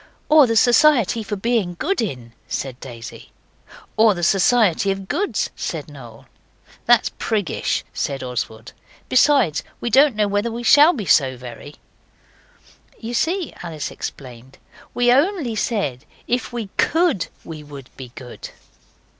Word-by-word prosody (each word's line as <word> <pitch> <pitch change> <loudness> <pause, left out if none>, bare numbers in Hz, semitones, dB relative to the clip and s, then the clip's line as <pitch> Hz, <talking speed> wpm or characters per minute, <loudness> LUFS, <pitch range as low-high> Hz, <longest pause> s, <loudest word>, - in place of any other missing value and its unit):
'Or 300 -3 +7
the 230 - 0
Society 245 -2 +4
for 210 -1 -4
Being 205 -4 -1
Good 365 - -1
In,' 125 - -5
said 130 -2 -5
Daisy. 115 -3 -10 0.7
'Or 220 -2 +5
the 175 - -5
Society 195 +1 +3
of 195 0 -3
Goods,' 390 - -1
said - - -5
Noel. - - -13 0.6
'That's 240 -1 +4
priggish,' 205 - -1
said 135 -1 -3
Oswald; 115 -2 -5 0.4
'besides, 255 - +3 0.2
we 235 - -3
don't 275 +1 +5
know 210 -1 +1
whether 205 +3 -1
we 235 +1 -6
shall 295 +8 +6
be 225 - -5
so 130 -6 +3
very.' 125 +4 -10 1.2
'You 230 +1 -6
see,' 340 +8 -1
Alice 160 -4 -5
explained, 130 -1 -9 0.4
'we 245 0 +3
only 285 - +1
said 150 - -2 0.2
if 245 +1 -2
we 235 -4 -5
COULD 320 - +1 0.2
we 160 -2 -9
would 140 -3 -12
be 130 -3 -10
good. 125 -2 -9
210 Hz, 140 wpm, -21 LUFS, -, 1.2 s, Or